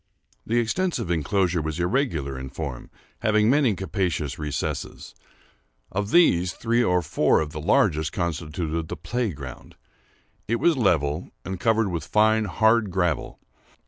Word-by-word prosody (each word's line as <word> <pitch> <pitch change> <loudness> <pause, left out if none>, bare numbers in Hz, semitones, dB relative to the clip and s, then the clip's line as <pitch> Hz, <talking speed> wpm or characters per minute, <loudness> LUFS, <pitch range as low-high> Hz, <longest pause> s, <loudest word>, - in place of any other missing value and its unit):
The 115 - +1
extensive 120 - 0
enclosure 85 +1 +1
was 80 +1 -4
irregular 90 - 0
in 65 0 -6
form, 70 -2 -6 0.3
having 110 0 +3
many 135 -7 +3
capacious 90 -7 -2
recesses. 75 -4 -4 0.8
Of 100 +1 -2
these, 90 - +4
three 120 +1 +1
or 90 -5 +2
four - - +2
of 75 -1 -3
the 75 - -6
largest 80 -1 +2
constituted 80 -1 -3
the - - -6
play 120 -2 -2
ground. 70 -5 -10 0.7
It 115 - +1
was 165 +7 +3
level, 85 - +1 0.2
and 95 -1 -4
covered 110 -1 +2
with 85 -4 -3
fine 110 +4 +3
hard 110 +3 +2
gravel. 90 -5 -1
90 Hz, 140 wpm, -24 LUFS, 80-110 Hz, 0.8 s, these